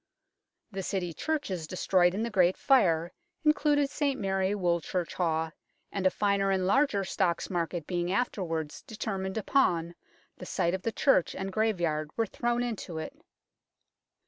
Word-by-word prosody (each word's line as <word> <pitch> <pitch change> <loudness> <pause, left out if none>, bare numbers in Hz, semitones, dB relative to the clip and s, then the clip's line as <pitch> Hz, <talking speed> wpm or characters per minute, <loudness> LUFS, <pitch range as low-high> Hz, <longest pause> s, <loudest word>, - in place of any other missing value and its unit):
The 195 -1 -4
City 180 -2 -2
churches 195 - -2
de 185 - -6
stroyed 180 -1 +3
in 215 - -1
the 235 - -2
Great 185 -3 +3
Fire 175 - +3 0.3
included 290 -2 +3
St 280 -3 0
Mary 195 0 0
Woolchurchhawe, 170 -2 -1 0.4
and 195 -2 +1
a - - +5
finer 200 0 +1
and 190 -1 +1
larger 205 -1 +3
Stocks 180 -2 -1
Market 170 -2 -2
being 175 0 -1
afterwards 175 -8 -2
determined 195 -3 -4
upon, 175 -8 +2 0.4
the 180 - -9
site 170 +1 0
of 190 - -2
the 230 - -1
church 220 - +2
and 190 0 -4
graveyard 175 -9 0
were 225 - +2
thrown 240 +3 -1
into 215 -8 -4
it. 160 - -5
190 Hz, 145 wpm, -29 LUFS, 175-220 Hz, 0.4 s, a